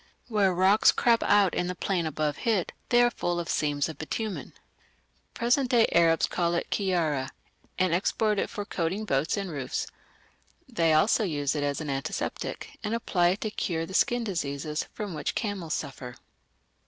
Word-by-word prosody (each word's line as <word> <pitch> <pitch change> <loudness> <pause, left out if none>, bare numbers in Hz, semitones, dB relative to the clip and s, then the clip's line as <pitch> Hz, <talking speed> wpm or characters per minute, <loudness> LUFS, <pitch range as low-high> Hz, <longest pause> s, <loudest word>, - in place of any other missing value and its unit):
Where 205 -4 +3
rocks 190 +4 +5
crop 235 -1 +3
out 205 -4 +4
in 180 - -1
the 180 - -3
plain 180 -3 -1
above 155 -1 -1
Hit, 215 -7 0 0.2
they 240 -1 +5
are 240 - +3
full 175 -5 -2
of 170 - -4
seams 145 -2 0
of 160 - -8
bitumen." 210 +6 -4 0.8
Present 245 +2 +2
day 235 -3 +5
Arabs 165 -1 +4
call 170 -1 0
it 170 - -3
"kiyara", 165 -9 0 0.5
and 185 -2 +2
export 210 +3 +1
it - - -1
for 205 - -5
coating 190 +4 -2
boats 145 +1 0
and 195 -3 -3
roofs; 140 -4 -3 0.8
they 170 -11 +1
also 155 +9 +4
use 145 -7 -1
it 150 - -2
as 145 +1 -1
an 150 -2 -3
antiseptic, 135 0 -4
and 215 +2 -1
apply 180 -6 +1
it 185 +4 0
to 215 - -2
cure 165 -5 -2
the 190 - -10
skin 240 +4 +2
diseases 150 -6 -3
from 205 -4 -4
which 150 - -3
camels 195 -8 -2
suffer. 125 -2 -6
175 Hz, 175 wpm, -27 LUFS, 155-210 Hz, 0.8 s, rocks